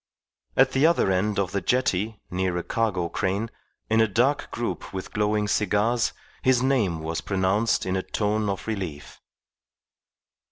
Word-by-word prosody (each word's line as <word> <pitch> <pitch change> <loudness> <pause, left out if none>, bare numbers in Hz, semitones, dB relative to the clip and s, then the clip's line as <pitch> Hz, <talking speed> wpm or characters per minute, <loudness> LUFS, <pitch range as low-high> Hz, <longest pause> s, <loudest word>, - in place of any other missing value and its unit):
At 130 0 +5
the 135 +4 +4
other 165 - +3
end 100 +3 +1
of 95 -2 0
the 100 - -1
jetty, 110 -3 0
near 90 -1 0
a 90 - -2
cargo 105 -7 0
crane, 100 +6 -2 0.4
in 110 +1 +3
a 110 - +4
dark 125 +8 +1
group 120 - -4
with 95 -1 -6
glowing 105 0 +1
cigars, 105 +3 +1 0.3
his 130 -1 +3
name 110 -12 +1
was 80 +1 -3
pronounced 100 +3 +1
in 95 0 -1
a 95 - 0
tone 105 +1 -1
of 95 -1 -3
relief. 95 -10 -5
105 Hz, 155 wpm, -25 LUFS, 95-115 Hz, 0.4 s, At